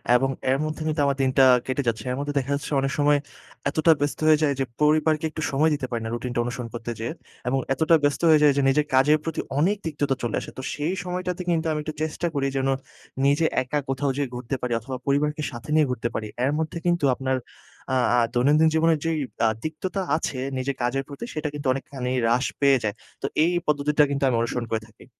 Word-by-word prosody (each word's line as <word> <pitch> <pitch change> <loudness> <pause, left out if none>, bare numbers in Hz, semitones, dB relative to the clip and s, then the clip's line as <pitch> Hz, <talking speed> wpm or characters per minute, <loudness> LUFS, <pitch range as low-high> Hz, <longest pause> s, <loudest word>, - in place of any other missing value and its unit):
এবং 135 +2 +3 0.2
এর 135 - +3
মধ্যে 155 +1 -4
কিন্তু 155 -1 0
আমার 140 0 +1
দিনটা 135 0 +4 0.2
কেটে 130 +2 -1
যাচ্ছে। 110 -2 0
এর 125 - -2
মধ্যে 145 0 -3
দেখা 135 +2 -4
যাচ্ছে 140 - -6
অনেক 135 - -1
সময় 145 0 +4 0.5
এতটা 155 +3 +3
ব্যস্ত 145 - -1
হয়ে 155 -1 +7
যায় 140 -2 +3
যে 135 - +1 0.2
পরিবারকে 155 +1 +3
একটু 155 - -6
সময় 150 +4 +3
দিতে 145 -3 -2
পারি 115 -2 -2
না 115 - -3
রুটিনটা 120 0 -3
অনুসরণ 120 -1 -4
করতে 120 0 -5
যেয়ে। 115 +6 -3 0.3
এবং 135 +2 +1
এতটা 160 +3 +4
ব্যস্ত 145 0 +1
হয়ে 155 - +7
যাই 145 - +7
যে - - +3
নিজের 150 +2 +2
কাজের 150 +4 +5
প্রতি 165 - -3 0.2
অনেক 190 +7 +3
তিক্ততা 145 -3 -1
চলে 120 - -1
আসে। - - -8
তো - - -4
সেই 155 +5 -1
সময়টাতে 180 0 -3
কিন্তু 165 -1 +1
আমি 150 - -1
একটু 155 0 -5
চেষ্টা 160 +2 -2
করি 135 -1 +1
যেন 135 0 0 0.6
নিজে 145 +4 +3 0.2
একা 145 +4 -1
কোথাও 135 +1 0
যেয়ে 140 -3 -1
ঘুরতে 125 +2 -3
পারি 125 -1 -1
অথবা 130 +3 -6
পরিবারকে 150 +2 +1
সাথে 120 +3 -9
নিয়ে 155 -1 +5
ঘুরতে 120 -1 -2
পারি। 110 - -2 0.2
এর 140 - +2
মধ্যে 160 +1 -3
কিন্তু 175 -3 +2
আপনার 130 -1 -1 0.6
আ - - +3 0.2
আ - - +5
দৈনন্দিন 145 +6 +4
জীবনের 160 -1 +3
যেই 165 -1 0 0.3
আ - - +5 0.2
তিক্ততা 185 +5 -3 0.2
আছে 140 -5 -3 0.2
নিজের 135 +1 -2
কাজের, 130 +3 0
প্রতি 140 +11 -7 0.5
অনেকখানি 135 -2 -4
হ্রাস 120 +3 +2 0.2
পেয়ে 140 -1 +5
যায়। 105 0 -1 0.3
তো - - -3 0.2
এই 170 - +3 0.2
পদ্ধতিটা 150 0 +3
কিন্তু 140 0 -1
আমি 120 - +1
অনুসরণ 115 +1 -2
করে 110 -1 0
থাকি। 110 - -18
140 Hz, 215 wpm, -24 LUFS, 130-155 Hz, 0.6 s, হয়ে